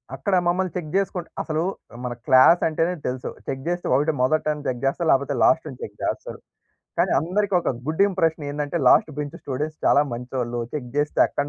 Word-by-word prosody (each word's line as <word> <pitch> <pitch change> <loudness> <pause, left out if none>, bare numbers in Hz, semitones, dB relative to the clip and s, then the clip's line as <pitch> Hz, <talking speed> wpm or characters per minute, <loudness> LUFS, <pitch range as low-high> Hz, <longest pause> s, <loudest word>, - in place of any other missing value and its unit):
అక్కడ 190 +8 0
మమ్మల్ని 180 +1 +1
చెక్ 160 -3 -5
జేసుకుంట 190 -3 -1
అసలు 155 -1 -2 0.4
మన 125 -1 -3
క్లాసంటేనే 165 +5 +5
తెలుసు, 125 0 -3 0.2
చెక్ 135 0 -4
జేస్తే 175 0 -2
ఒకటి 150 +4 +2
మొదటన్నా 150 +2 0
చెక్ 125 -2 -2
జేస్తారు, 155 +5 0
లేపోతే 135 +1 +2
లాస్టన్న 155 -5 +2
చెక్ - - -9
జేస్తరు. - - -3 0.6
కానీ - - +3
అందరికొక 180 +3 +1 0.2
గుడ్ 160 +3 -2
ఇంప్రెషనేందంటే, 155 -4 -1
లాస్ట్ 155 - +5
బెంచ్ 150 +2 -4
స్టూడెంట్స్ 150 +3 -3
చాలా - - +5
మంచోళ్ళు, 120 0 -3
చెక్ 140 -5 -4
జేస్తే 145 +1 0
అక్కడి 145 0 -3
150 Hz, 155 wpm, -23 LUFS, 135-170 Hz, 0.6 s, క్లాసంటేనే